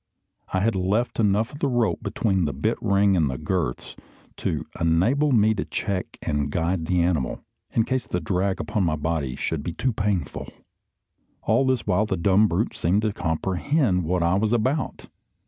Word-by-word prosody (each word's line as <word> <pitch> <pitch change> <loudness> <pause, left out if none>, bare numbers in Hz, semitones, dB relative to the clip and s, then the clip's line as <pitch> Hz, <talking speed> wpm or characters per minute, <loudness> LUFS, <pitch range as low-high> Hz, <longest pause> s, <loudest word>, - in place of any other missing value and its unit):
I 95 - +1
had 115 +3 +2
left 100 +7 0
enough 105 +2 +2
of 145 - -9
the 145 - +1
rope, 120 -4 +1
between 100 -4 0
the 75 - -2
bit 110 - -1
ring 100 -1 +3
and 80 -5 +2
the 65 - -3
girths, 80 -5 -3 0.4
to - - -2
enable 110 - +2
me 110 -3 +4
to - - -2
check 100 -3 -3
and 75 -1 -1
guide 85 0 -1
the 90 -2 +2
animal, 80 -7 -1 0.3
in 115 - +2
case 130 +2 -2
the 90 - -1
drag 95 +3 -1
upon 105 -4 -1
my 80 -3 +1
body 75 -4 -2
should 80 +2 -2
be 85 +3 -4
too 120 +6 -1
painful. 100 -7 -2 1.0
All 130 +5 +2
this 130 -3 +1
while 105 +2 +2
the 95 - -1
dumb 100 +5 +4
brute - - -1
seemed 95 +6 +1
to 110 -2 0
comprehend 90 - 0
what 85 +1 0
I 85 +1 +2
was 105 +4 +1
about. 130 +6 -1
95 Hz, 180 wpm, -24 LUFS, 85-110 Hz, 1.0 s, me